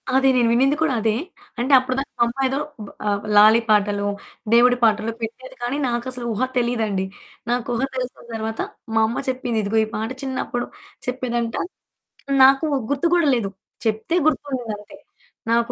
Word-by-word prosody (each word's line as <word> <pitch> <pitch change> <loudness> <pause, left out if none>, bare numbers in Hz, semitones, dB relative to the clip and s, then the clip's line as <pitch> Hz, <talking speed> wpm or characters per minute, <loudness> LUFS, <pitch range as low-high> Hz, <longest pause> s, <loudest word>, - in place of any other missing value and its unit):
అది 270 0 +4
నేను 240 -2 +4
వినింది 270 +4 +3
కూడా 315 -4 +2
అదే. 220 0 +2 0.4
అంటే 260 +4 +1
అప్పుడు 255 0 -3
దాకా 275 - -5
మా - - +6
అమ్మ 265 +3 -1
ఏదో 270 +2 -1 0.5
ఆహ్, 200 0 0
లాలీ 215 +2 +8
పాటలో, 205 -1 +2 0.5
దేవుడి 245 +1 +6
పాటలో 220 0 +3
పెట్టేది. 260 +4 -6
కానీ 245 +4 -1
నాకసలు 245 +1 -3
ఊహ 215 - -3 0.2
తెలియదండి. 225 -6 0 0.4
నాకు 240 -1 0
ఊహ 235 - -1
తెలిసిన 255 -1 -4
తరువాత 220 0 -3 0.3
మా 225 - +4
అమ్మ 230 - -2
చెప్పింది, 250 -3 -1
"ఇదిగో, 205 +3 0
ఈ - - -11
పాట 220 +1 -2
చిన్నప్పుడు" 260 -2 -3 0.4
చెప్పేదంట 240 -2 -2 0.9
నాకు 270 +3 +6 0.3
గుర్తు 285 +4 +1
కూడా 345 -3 +4
లేదు. 215 -5 -1 0.4
చెప్తే 220 +9 0
గుర్తుండింది, 260 -7 -1
అంతే. 205 0 -14 0.5
నాకు 235 +1 +2
240 Hz, 155 wpm, -22 LUFS, 220-260 Hz, 0.9 s, లాలీ